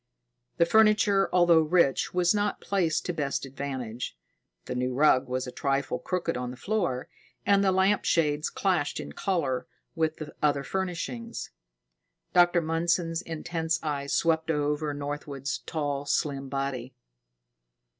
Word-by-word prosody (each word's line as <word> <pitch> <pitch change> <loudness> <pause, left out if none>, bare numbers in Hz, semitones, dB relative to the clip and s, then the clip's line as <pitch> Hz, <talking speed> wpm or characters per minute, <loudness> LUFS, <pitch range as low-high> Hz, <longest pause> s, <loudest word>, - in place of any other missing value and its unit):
The 170 - +5
furniture, 210 -1 +4
although 175 -2 +5
rich, 155 -3 +2
was 180 +1 +3
not 205 -1 0
placed 180 -6 0
to 175 - -1
best 140 -3 -2
advantage. 130 - -5 0.5
The - - -4
new 125 0 -1
rug 135 -2 +4
was 130 0 -1
a 125 - -6
trifle 140 +1 -1
crooked 175 -2 -2
on 125 0 -3
the 125 - -8
floor, 175 -10 -1 0.4
and 200 0 +4
the 190 - +4
lamp 190 +2 +3
shades 150 -2 +1
clashed - - 0
in 70 - -6
color 130 - -1 0.3
with 160 -1 0
the 155 -1 -7
other 145 -2 +2
furnishings. 190 - -4 0.8
Dr. 175 -1 +5
Mundson's 165 +1 0
intense 165 -1 -2
eyes 140 -2 -2
swept 160 -1 +1
over 150 0 0
Northwood's 145 -1 -4
tall, 145 -3 -2
slim 140 -1 -1
body. 135 -2 -3
155 Hz, 135 wpm, -28 LUFS, 140-175 Hz, 0.8 s, The